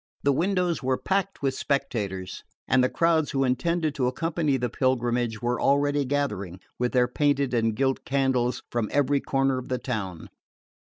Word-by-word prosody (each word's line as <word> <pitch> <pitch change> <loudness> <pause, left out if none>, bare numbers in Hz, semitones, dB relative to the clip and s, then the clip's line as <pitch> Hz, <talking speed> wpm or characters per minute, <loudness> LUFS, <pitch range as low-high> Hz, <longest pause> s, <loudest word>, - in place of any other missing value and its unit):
The 140 - +3
windows 180 +2 0
were 130 -1 0
packed 195 -3 -2
with 135 -1 +1
spectators, 105 -10 -2 0.2
and 130 -1 +4
the 130 - +2
crowds 165 -2 +2
who 135 -1 0
intended 155 +5 0
to 130 -4 0
accompany 155 +1 0
the 125 -1 -1
pilgrimage 120 -2 0
were 120 0 0
already 145 0 +2
gathering, 105 -10 -2 0.2
with 125 0 0
their 125 -1 +4
painted 140 0 +1
and 115 -2 +1
gilt 135 +2 0
candles, 130 -3 0
from 115 -3 -1
every 145 0 +2
corner 135 -1 +1
of 130 - -9
the 130 - 0
town. 105 -9 -5
130 Hz, 165 wpm, -26 LUFS, 120-145 Hz, 0.2 s, and